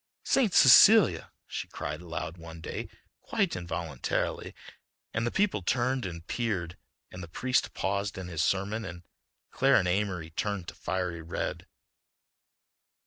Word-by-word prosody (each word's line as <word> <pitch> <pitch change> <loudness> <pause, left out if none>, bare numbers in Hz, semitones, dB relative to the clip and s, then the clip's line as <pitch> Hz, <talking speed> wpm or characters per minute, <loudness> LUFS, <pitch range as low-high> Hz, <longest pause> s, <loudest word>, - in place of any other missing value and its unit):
"St. 245 -7 +2
Cecelia," 195 - +7
he - - -5
cried 75 +2 -5
aloud 85 -1 -5
one 85 -1 -10
day, - - -6 0.3
quite - - -1
involuntarily, 85 -6 -3 0.6
and 115 +1 0
the - - -1
people 200 - +1
turned 125 +4 0
and 85 -2 -8
peered, 95 -8 -2 0.4
and 90 - -8
the 85 - -7
priest 125 +10 0
paused 100 +1 -2
in 95 -1 -6
his 85 -3 -2
sermon 100 +5 0
and 85 -3 -8 0.5
Clara - - +4
and 90 - +2
Amory 90 -3 -1
turned 100 +1 -3
to - - -10
fiery 90 -3 -3
red. 80 +1 -4
95 Hz, 140 wpm, -29 LUFS, 85-115 Hz, 0.6 s, Cecelia